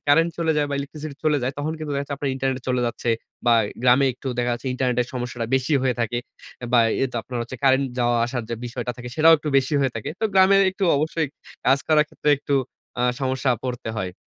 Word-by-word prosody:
Current 165 +4 +5
চলে 165 -1 +2
যায় 150 -1 +2
বা - - -1
ইলেকট্রিসিটি 145 +1 -6
চলে 155 -1 +3
যায়। 130 +2 -1
তখন 150 +2 -2
কিন্তু 155 -1 -5
দেখা 140 - -1
যাচ্ছে 140 0 -5
আপনার 140 0 -2
ইন্টারনেটে 130 -1 -2
চলে 125 -1 +1
যাচ্ছে। 120 0 -2 0.4
বা 120 - +6 0.3
গ্রামে 125 +2 +5
একটু 130 +2 -7
দেখা 120 0 +1
যাচ্ছে 120 +2 -5
ইন্টারনেটের 125 -1 0
সমস্যাটা 120 -2 -3
বেশি 130 +3 0
হয়ে 130 -2 +1
থাকে। 115 +1 -1 0.5
বা 120 - +6 0.2
এইতো 130 -2 -1
আপনার 125 +1 -5
হচ্ছে 125 +2 -7
কারেন্ট 135 0 +4
যাওয়া 120 -1 +2
আসার 120 0 -3
যে - - 0
বিষয়টা 120 0 -4
থাকে 120 0 -7
সেটাও 160 +1 +7
একটু 150 - -5
বেশি 135 +3 -1
হয়ে 135 -3 +1
থাকে। 115 - -4
তো - - 0
গ্রামের 195 +1 +6
একটু 190 +1 -2
অবশ্যই 155 +1 -1 0.4
কাজ 135 +2 +5
করার 155 -1 +5
ক্ষেত্রে 150 - -1
একটু 140 - -2 0.5
আ - - +2 0.2
সমস্যা 130 0 0
পড়তে 125 -3 -4
হয়। 95 -3 -3
130 Hz, 220 wpm, -23 LUFS, 125-150 Hz, 0.5 s, সেটাও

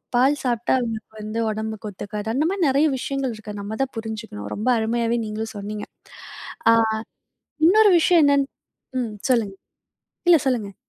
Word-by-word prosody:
பால் 265 +4 +4
சாப்பிட்டா, 240 -2 0
அவங்களுக்கு 220 -2 -5
வந்து 215 +2 -3
உடம்புக்கு 220 0 -4
ஒத்துக்காது. 205 +2 -6
அந்த 295 +6 +1
மாரி 380 -5 +1
நிறைய 280 +4 +3
விஷயங்கள் 270 -3 -2
இருக்கு. 210 -1 -8
நம்ம 210 +2 -5
தான் 270 - -5
புரிஞ்சுக்கணும். 220 - -6
ரொம்ப 220 +5 -1
அருமையாவே 230 +1 0
நீங்களும் 220 +1 -5
சொன்னீங்க. 210 +1 -5 0.9
ஆ - - +7 0.9
இன்னொரு 415 +3 +6
விஷயம் 340 0 +5
என்னன்னு 280 -1 +3 0.5
ம் 230 -3 -3 0.2
சொல்லுங்க. 215 -6 +1 0.7
இல்ல 340 - +8
சொல்லுங்க. 215 -7 -1
225 Hz, 145 wpm, -23 LUFS, 215-270 Hz, 0.9 s, இல்ல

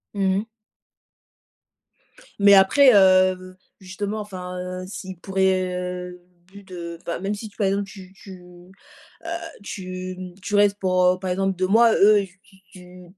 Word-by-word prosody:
Mmh 190 -1 +1
mh. 215 - -5 1.9
Mais 200 0 +6
après 250 +8 +6
heu, 185 -1 +3 0.2
justement, 200 +3 -5
enfin, 180 -3 -7
heu, 185 0 -6
s'ils 190 -2 -8
pourraient, 190 -1 0
heu, 180 0 -6 0.3
vu 200 0 -13
de 170 -3 -8
ben, 170 - -4
même 195 +2 -3
si, 210 +1 -7
par 200 -3 +1
exemple, 200 +1 -1
tu 190 -2 -13
tu, 190 -2 -13 0.8
heu, - - -7 0.4
tu, 185 -2 -7
mmh, 180 -1 -9
tu 205 +2 -3
restes 205 0 +3
pour, 185 -1 +1
heu, 180 0 +2
par 185 -1 -4
exemple, 195 +1 -1
2 185 +1 -1
mois, 225 +3 +5
eux, 205 0 +5 0.2
tu 200 -3 -23 0.2
tu, 180 0 -14
190 Hz, 155 wpm, -22 LUFS, 185-200 Hz, 1.9 s, Mais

